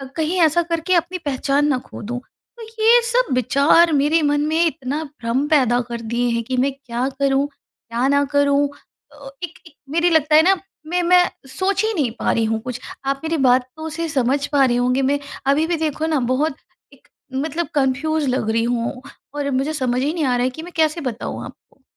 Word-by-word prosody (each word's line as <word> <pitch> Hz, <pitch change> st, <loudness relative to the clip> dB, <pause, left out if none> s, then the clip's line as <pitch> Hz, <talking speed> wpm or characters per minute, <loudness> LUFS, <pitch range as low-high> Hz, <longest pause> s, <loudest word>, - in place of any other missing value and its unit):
कहीं 330 Hz, +3 st, -1 dB
ऐसा 325 Hz, +1 st, +4 dB
करके 335 Hz, +2 st, -1 dB
अपनी 345 Hz, +2 st, 0 dB
पहचान 280 Hz, +1 st, +1 dB
ना 280 Hz, -3 st, +2 dB
खो -, -, -9 dB
दूँ। 240 Hz, +3 st, -4 dB, 0.4 s
तो -, -, -11 dB, 0.2 s
ये 470 Hz, +2 st, +7 dB
सब 475 Hz, -, +1 dB
विचार 280 Hz, +7 st, +4 dB
मेरे 295 Hz, +3 st, +3 dB
मन 290 Hz, -1 st, +1 dB
में 320 Hz, +2 st, +2 dB
इतना 290 Hz, -1 st, -2 dB
भ्रम 275 Hz, -2 st, -2 dB
पैदा 255 Hz, -6 st, +3 dB
कर 235 Hz, -1 st, -5 dB
दिए 235 Hz, +2 st, -1 dB
हैं 230 Hz, -, -1 dB
कि 255 Hz, +3 st, -3 dB
मैं 270 Hz, +2 st, +2 dB
क्या 255 Hz, -2 st, -3 dB
करूँ, 275 Hz, 0 st, +2 dB
क्या 255 Hz, -3 st, -5 dB
ना 280 Hz, +1 st, +3 dB
करूँ? 285 Hz, 0 st, +3 dB, 0.5 s
अ, 285 Hz, -2 st, -11 dB
एक 340 Hz, -2 st, -7 dB
एक 315 Hz, -, -17 dB, 0.2 s
मेरी 335 Hz, +4 st, +2 dB
लगता 310 Hz, -2 st, +3 dB
है 310 Hz, -, +8 dB
ना 385 Hz, +3 st, +5 dB, 0.3 s
मैं 355 Hz, +2 st, 0 dB
मैं 360 Hz, +1 st, +5 dB, 0.2 s
सोच 385 Hz, +8 st, -1 dB
ही 440 Hz, 0 st, 0 dB
नहीं 285 Hz, -, 0 dB
पा -, -, +1 dB
रही 230 Hz, -, +1 dB
हूँ 220 Hz, 0 st, -1 dB
कुछ। 250 Hz, +1 st, -6 dB, 0.3 s
आप 275 Hz, 0 st, -1 dB
मेरी 325 Hz, 0 st, -1 dB
बातों 260 Hz, +4 st, +1 dB
से 330 Hz, +2 st, -3 dB
समझ 275 Hz, 0 st, +1 dB
पा 285 Hz, -2 st, +3 dB
रहे 240 Hz, -2 st, +1 dB
होंगे, 250 Hz, +2 st, +1 dB
मैं 280 Hz, +2 st, +1 dB, 0.3 s
अभी 295 Hz, +4 st, +3 dB
भी 345 Hz, -, 0 dB
देखो 310 Hz, -1 st, -2 dB
ना 310 Hz, -3 st, +1 dB
बहुत 275 Hz, +2 st, 0 dB, 0.4 s
एक -, -, -23 dB, 0.3 s
मतलब 315 Hz, +5 st, -2 dB
कन्फ्यूज़ 285 Hz, +3 st, +1 dB
लग 250 Hz, -4 st, -1 dB
रही 230 Hz, +1 st, +1 dB
हूँ 240 Hz, +2 st, -2 dB, 0.3 s
और 285 Hz, -1 st, -2 dB
मुझे 270 Hz, +4 st, 0 dB
समझ 255 Hz, -4 st, 0 dB
ही 290 Hz, +4 st, 0 dB
नहीं 335 Hz, -2 st, -2 dB
आ 250 Hz, -2 st, +2 dB
रहा 245 Hz, -, +1 dB
है 255 Hz, -, +2 dB
कि 260 Hz, +5 st, -9 dB
मैं 350 Hz, +1 st, -10 dB
कैसे 315 Hz, +1 st, +2 dB
बताऊँ 250 Hz, -5 st, -4 dB
आपको? -, -, -16 dB
285 Hz, 210 wpm, -20 LUFS, 255-320 Hz, 0.5 s, है